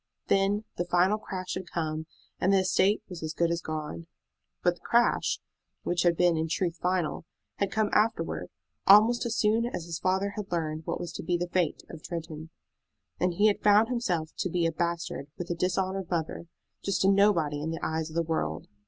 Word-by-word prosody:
Then 200 +2 +2
the 175 - -1
final 180 +4 +3
crash 185 -3 -5
had 185 -2 -5
come, 160 -1 -3 0.3
and 190 - +2
the 195 -1 +5
estate 190 +2 +2
was 180 -4 -8
as 155 0 -4
good 170 0 +2
as 170 0 -1
gone. 150 - -5 0.6
But - - +4
the - - -21
crash, - - +2 0.4
which 175 0 0
had 170 -2 +3
been 175 -1 +4
in 160 0 0
truth 170 +1 -1
final, 180 -4 -1 0.3
had 200 -1 0
come 215 -1 +1
afterward, 220 +2 +1 0.4
almost 225 +5 +6
as 230 - -2
soon 225 +2 +2
as 175 -8 -5
his 170 -1 -5
father 190 +2 +1
had 205 -3 -5
learned 155 -2 -2
what - - -2
was 175 - -5
to - - -6
be 175 +1 +1
the 175 0 -3
fate 175 -4 0
of 160 - -10
Tretton; 160 -2 -6 0.7
and 180 -1 +1
he 205 - +3
had 210 -2 +3
found 210 +2 +5
himself 175 -11 -1
to 185 - -1
be 175 0 0
a 165 - +2
bastard 170 -4 -3
with 175 0 -4
a - - 0
dishonored 185 +1 -1
mother, 170 -1 -3 0.3
just 195 -1 0
a - - +5
nobody 190 -7 +3
in 155 - -2
the 165 0 -4
eyes 160 0 -2
of 160 - -11
the 170 - +2
world. 80 - -2
175 Hz, 205 wpm, -28 LUFS, 160-195 Hz, 0.7 s, almost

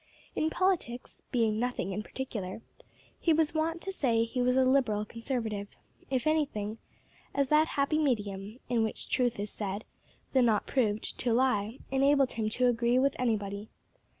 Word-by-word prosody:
In 315 - +1
politics, 335 -10 -1
being 220 -3 +2
nothing 245 -6 -1
in 210 - -2
particular, 215 -4 -5 0.6
he 330 - +3
was 315 0 +2
wont 325 +1 -1
to 390 - -3
say 235 -9 +2
he 240 +2 -2
was 250 +1 +3
a 260 0 +4
Liberal 245 -6 +2
Conservative, 225 -3 -3 0.4
if 260 0 0
anything, 250 -9 0 0.6
as 280 -2 +2
that 305 +1 +5
happy 280 +2 +2
medium, 210 -5 -1
in 240 -2 +1
which 220 -1 -3
truth 245 -3 +1
is 205 0 -3
said, 205 0 -4 0.5
though 260 - +5
not 225 -4 +3
proved, 220 -5 0
to 235 -2 +1
lie, 235 -2 +1
enabled 275 0 +4
him 220 -1 -1
to 250 +3 +1
agree 240 0 +3
with 275 +1 +3
anybody. 210 -3 -1
245 Hz, 160 wpm, -30 LUFS, 215-275 Hz, 0.6 s, that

